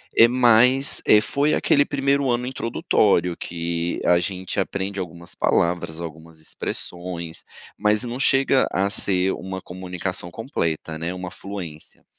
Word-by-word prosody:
eh, 115 - +8
mais, 125 +2 +4
eh, 105 - +7
foi 145 +6 0
aquele 145 0 +3
primeiro 140 -1 +1
ano 120 +1 -1
introdutório, 105 -7 +1
que 85 0 -3
a 90 - +5
gente 95 +1 -3
aprende 100 +1 -3
algumas 85 -1 -7
palavras, 85 -1 0
algumas 80 0 -9
expressões, 85 +1 -6 0.3
mas 105 +2 +2
não 120 +1 -5
chega 135 -1 +3
a 100 +1 +1
ser 95 -2 +2
uma 95 0 -6
comunicação 90 -1 -5
completa, 80 - -3
né. 85 +3 -3
Uma 90 0 -6
fluência. 90 -7 -8
95 Hz, 135 wpm, -23 LUFS, 85-120 Hz, 0.3 s, eh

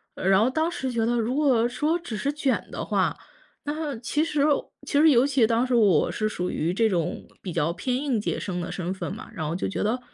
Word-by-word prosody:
然 190 +1 +3
后 240 - +3
当 320 +5 0
时 265 -6 -3
觉 230 -2 0
得 240 +1 +1
如 235 +4 -1
果 255 -6 +3
说 310 +7 0
只 240 -10 -6
是 280 +6 -1
卷 285 -3 -1
的 - - -4
话， - - +1 0.5
那 295 -2 -3
其 295 +6 0
实 300 -3 0 0.4
其 285 - +1
实 320 - +7
尤 255 +2 +5
其 260 -5 +3
当 230 +3 +1
时 250 - +1
我 200 -9 +4
是 215 0 -1
属 180 -3 -3
于 170 +3 -1
这 225 +3 +3
种 175 -2 -2 0.2
比 185 - -5
较 165 0 0
偏 250 +6 -2
应 270 -5 0
届 - - -2
生 180 -2 -3
的 175 - -5
身 180 0 -3
份 190 - -5
嘛， 215 - -9
然 160 -6 -4
后 160 - -2
就 180 - -2
觉 195 - -2
得， 230 +4 0
235 Hz, 260 characters per minute, -25 LUFS, 190-280 Hz, 0.5 s, 实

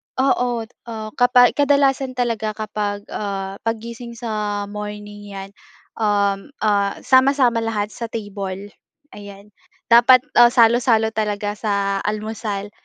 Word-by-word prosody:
oo, 250 -3 +1 0.2
ah, 220 -2 -6
kapa 245 0 +6
kadalasan 275 -2 +1
talaga 230 -3 -2
kapag, 210 -2 -4
ah, 195 -1 -4
paggising 235 +1 -5
sa 210 -3 -3
morning, 210 0 -8
'yan, 195 0 -8 0.5
um, 200 -2 +1 0.2
ah, 200 -2 +1
sama-sama 260 -2 +4
lahat 215 -2 -2
sa 235 - -6
table, 205 -3 -6 0.4
ayan. 205 0 -12 0.4
Dapat, 240 +2 +7 0.2
ah, 240 - +9
salo-salo 230 -1 +4
talaga 210 -1 -2
sa 200 -2 -1
almusal, 210 -1 -4
215 Hz, 110 wpm, -20 LUFS, 205-240 Hz, 0.5 s, ah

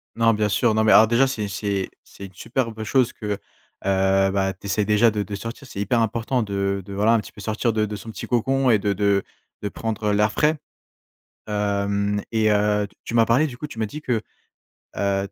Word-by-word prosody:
Non, 115 0 +4
bien 105 0 0
sûr. 110 +3 +2
Non, 110 - +3
mais 110 - +4
alors 110 - +8
déjà, 120 +4 +4
c'est 110 -6 -3
c'est 100 0 -2
c'est 100 - -11
une 95 - -12
superbe 115 +2 -3
chose 125 +3 +2
que, 110 - -10
heu - - -12 0.5
heu, 95 0 +3
bah, 95 0 +1
t'essaies 100 +2 -2
déjà 105 +3 +4
de 105 -1 -2
de 100 +1 -6
sortir. 115 +7 -7
C'est 100 - -8
hyper 105 +4 +1
important 115 +3 0
de 100 -1 -1
de 100 - -8
voilà, 105 +3 +3
un 115 - +4
petit - - -12
peu - - -15
sortir 110 +3 -1
de 110 -1 +1
de 105 0 -5
son 110 +2 -8
petit - - -7
cocon 130 +2 +1
et 110 - +5
de 100 0 -1
de 100 0 +1 0.4
de 105 - -2
prendre 110 0 -2
l'air 105 +1 +3
frais. 150 +5 +2 0.9
Hem 100 0 0
et 110 -1 +3
heu, 105 0 +2 0.2
tu - - -5
m'as 115 -1 +5
parlé, 125 +8 +3
du 125 -4 -9
coup. 150 - -5
Tu 115 - -10
m'as 110 - +1
dit 150 +9 -8
que, 130 - -4 0.9
heu, 100 0 0
105 Hz, 225 wpm, -23 LUFS, 100-115 Hz, 0.9 s, alors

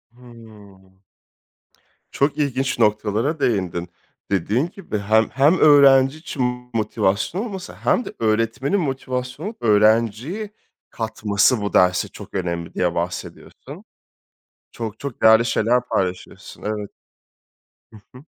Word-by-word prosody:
Hıı. 110 -5 -16 1.3
Çok 140 +2 0
ilginç 135 -2 -1
noktalara 110 +8 +1
değindin. 90 -7 -1 0.4
Dediğin 105 - 0
gibi 170 - -5
hem 110 +2 +2
hem 145 +7 +3
öğrenci 140 -1 +6
için 125 -5 -4
motivasyon 110 - -1
olması 195 -3 -7
hem 245 - 0
de - - -8
öğretmenin 115 - 0
motivasyona 135 - -4
öğrenciyi 115 - +2 0.4
katması 110 0 0
bu 100 - -3
derse 90 0 +3
çok - - -13
önemli 85 -3 -3
diye 90 -1 -1
bahsediyorsun. 85 +1 -6 0.9
Çok 110 -2 -6
çok 140 -4 -7
değerli 110 +1 +6
şeyler 120 +1 +2
paylaşıyorsun. 90 -1 -4
Evet. 105 -1 -4 1.0
Hı 110 - -13 0.2
hı. 130 - -15
115 Hz, 110 wpm, -21 LUFS, 105-135 Hz, 1.3 s, öğrenci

